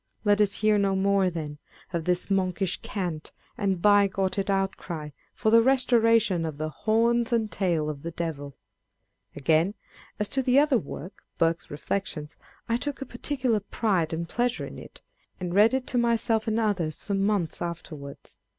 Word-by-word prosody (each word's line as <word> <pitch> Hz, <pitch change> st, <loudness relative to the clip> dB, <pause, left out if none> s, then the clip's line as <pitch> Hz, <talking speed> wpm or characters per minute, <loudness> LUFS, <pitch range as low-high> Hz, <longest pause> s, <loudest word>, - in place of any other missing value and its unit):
Let 205 Hz, -1 st, +4 dB
us 200 Hz, -1 st, +2 dB
hear 215 Hz, -1 st, +4 dB
no 195 Hz, -1 st, +2 dB
more, 195 Hz, -1 st, +3 dB
then, 150 Hz, -4 st, -6 dB, 0.3 s
of 165 Hz, -2 st, -2 dB
this 180 Hz, +2 st, +1 dB
monkish 185 Hz, -1 st, 0 dB
cant, 175 Hz, -6 st, -4 dB, 0.2 s
and 195 Hz, -3 st, 0 dB
bigoted 195 Hz, -1 st, +3 dB
out 195 Hz, 0 st, +1 dB
cry 155 Hz, -4 st, -7 dB, 0.2 s
for 220 Hz, -, +1 dB
the 230 Hz, 0 st, +7 dB
restoration 230 Hz, -7 st, +3 dB
of 155 Hz, -3 st, -4 dB
the 155 Hz, +1 st, -2 dB
horns 230 Hz, +6 st, +1 dB
and 225 Hz, -2 st, +1 dB
tail 170 Hz, -6 st, 0 dB
of 150 Hz, -2 st, -5 dB
the 170 Hz, -, -4 dB
devil! 160 Hz, -4 st, -4 dB, 0.8 s
â€" -, -, -13 dB
Again, 160 Hz, +7 st, +2 dB, 0.4 s
as 210 Hz, -, 0 dB
to 270 Hz, -, 0 dB
the 255 Hz, 0 st, +3 dB
other 285 Hz, -4 st, +4 dB
work, 155 Hz, +5 st, -9 dB
Burke's 165 Hz, 0 st, +1 dB
Reflections, 150 Hz, 0 st, -4 dB, 0.3 s
I 230 Hz, -, +1 dB
took 285 Hz, +2 st, -4 dB
a -, -, -10 dB
particular 250 Hz, -2 st, -1 dB
pride 195 Hz, -5 st, 0 dB
and 170 Hz, +1 st, -3 dB
pleasure 245 Hz, +5 st, -1 dB
in -, -, -9 dB
it, -, -, -13 dB, 0.4 s
and 180 Hz, -2 st, -3 dB
read 210 Hz, +4 st, +6 dB
it 260 Hz, -1 st, -1 dB
to 245 Hz, -, 0 dB
myself 230 Hz, -2 st, +1 dB
and 220 Hz, +1 st, +1 dB
others 190 Hz, -8 st, -1 dB
for 200 Hz, -, -3 dB
months 195 Hz, -3 st, 0 dB
afterwards. 155 Hz, -4 st, -7 dB
195 Hz, 170 wpm, -27 LUFS, 170-225 Hz, 0.8 s, the